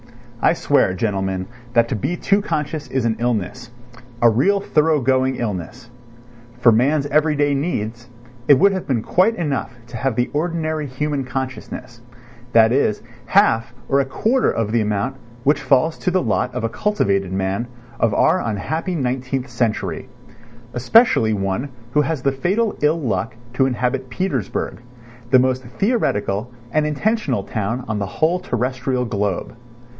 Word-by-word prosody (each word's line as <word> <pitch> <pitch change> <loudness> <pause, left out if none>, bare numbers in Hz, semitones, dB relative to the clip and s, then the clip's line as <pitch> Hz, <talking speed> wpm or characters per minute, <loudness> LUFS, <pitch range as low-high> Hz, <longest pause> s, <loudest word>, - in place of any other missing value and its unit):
I - - +5
swear, 140 - +2
gentlemen, 95 -2 -1 0.3
that 115 -1 +4
to 130 - -1
be 140 - -2
too 200 +3 +2
conscious 155 -4 -3
is 130 -3 -1
an 110 -1 0
illness—a 120 +2 -3
real 170 - +3
thorough 155 -4 +2
going 130 0 +2
illness. 115 +3 -5 0.7
For 120 -1 +6
man's 140 +6 +2
everyday 145 -1 +2
needs, 120 -5 -3 0.4
it 140 - +7
would 200 +6 +5
have 190 -2 -4
been 120 -5 0
quite 205 +6 +2
enough 140 - -2
to 120 -1 -8
have 130 0 -1
the 125 +1 0
ordinary 155 -1 -1
human 140 +1 -2
consciousness, 130 -2 -6 0.5
that 110 -1 +6
is, 115 -5 +1 0.2
half 120 - +3
or 140 - +3
a 140 - +2
quarter 225 - +1
of 110 -2 -2
the 115 0 +2
amount 105 +5 -1 0.3
which 145 +2 +2
falls 135 +4 +2
to - - 0
the 185 0 +1
lot 125 - 0
of 125 - -2
a 115 - 0
cultivated 100 - 0
man 95 +5 -1 0.3
of 115 - +3
our - - +3
unhappy 160 - -2
nineteenth 130 -1 -2
century, 110 -7 -2 0.6
especially 125 - +4
one 100 +6 -2 0.2
who 150 - +4
has 150 -2 -2
the 140 - +3
fatal 195 +11 0
ill 150 +3 +2
luck 115 - -2 0.2
to 130 +1 +3
inhabit 125 +1 -1
Petersburg, 130 - -2 0.5
the 130 - +6
most 130 0 +2
theoretical 125 - -1 0.2
and 155 +2 +2
intentional 150 - 0
town 115 +5 -3
on 105 -1 -2
the 100 - -2
whole 160 - +1
terrestrial 125 -3 -1
globe. 105 -1 -2
130 Hz, 150 wpm, -20 LUFS, 115-150 Hz, 0.7 s, it